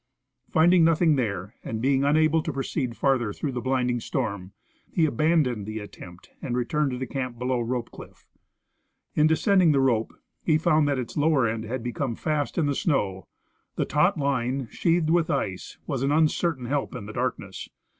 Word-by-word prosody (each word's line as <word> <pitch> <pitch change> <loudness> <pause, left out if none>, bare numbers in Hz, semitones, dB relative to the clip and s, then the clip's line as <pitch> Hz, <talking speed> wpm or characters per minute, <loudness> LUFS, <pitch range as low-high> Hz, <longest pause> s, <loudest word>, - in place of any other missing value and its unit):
Finding 170 +2 +5
nothing 165 -1 +4
there, 100 -5 -2
and 110 - -4
being 135 +3 +2
unable 155 +2 +3
to 155 - -3
proceed 135 -3 -3
farther 130 -6 +1
through 140 +7 -4
the 125 -1 -4
blinding 125 -1 0
storm, 100 -6 -3 0.4
he 165 - +2
aban 155 +4 +2
doned 115 -5 -3
the 110 0 -5
attempt 90 -4 -11
and 125 -2 -2
returned 145 +4 0
to 125 - -4
the 130 - -3
camp 125 -1 -4
below 125 0 -1
Roj)e 120 0 -3
cliff. - - -13 0.9
In 155 0 +4
descending 175 0 +4
the 140 - +3
rope, 120 -4 +1 0.3
he 155 -2 +2
found 155 -2 +3
that 140 -2 +1
its 125 +2 -5
lower 145 -5 +3
end 110 0 -3
had 120 +1 -4
become 120 0 -3
fast 150 +1 -2
in 165 - +2
the 145 - +1
snow. 100 - -1 0.5
The - - 0
taut - - +2
line, 135 -2 -1
sheathed 165 -2 +1
with 170 -1 +2
ice, 95 -10 -3
was 135 -5 -3
an 135 +1 +1
un 155 +1 +5
certain 150 -5 -2
help 140 +1 -2
in 110 -5 -6
the 105 - -8
darkness. 115 -6 -4
135 Hz, 185 wpm, -25 LUFS, 120-155 Hz, 0.9 s, Finding